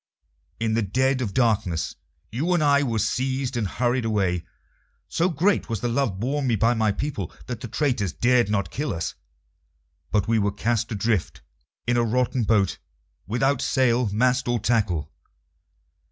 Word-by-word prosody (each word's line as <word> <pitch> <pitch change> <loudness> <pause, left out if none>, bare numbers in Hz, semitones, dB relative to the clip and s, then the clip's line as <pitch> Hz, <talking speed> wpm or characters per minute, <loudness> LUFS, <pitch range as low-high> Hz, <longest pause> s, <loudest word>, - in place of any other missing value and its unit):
In 110 -1 0
the 115 - +2
dead 130 +6 +1
of 110 -6 -2
darkness 105 -8 +1 0.4
you 160 +11 0
and 160 - +2
I 140 -1 +4
were 120 -5 -1
seized 130 +4 -1
and 115 -4 0
hurried 120 +4 0
away. 95 -6 0 0.6
So 175 +2 +1
great 185 +5 +1
was 115 -3 -2
the 120 - 0
love 115 -6 0
borne 135 +4 -1
me 120 - +2
by 115 +4 +3
my 110 -2 +2
people 105 - -3
that 120 -2 -5
the - - -5
traitors 120 - 0
dared 120 +7 +2
not 100 -2 -1
kill 150 - -2
us, 80 0 -3 1.0
but 105 -2 +1
we 115 0 +3
were 100 -1 0
cast 115 +2 -1
adrift 110 -2 -1 0.4
in 120 0 +1
a 120 - +3
rotten 125 +1 +1
boat, 100 -3 +2 0.5
without 130 +5 +1
sail, 125 -3 +2
mast, 125 +4 +2
or 120 0 +2
tackle. 105 -8 0
115 Hz, 165 wpm, -24 LUFS, 105-130 Hz, 1.0 s, I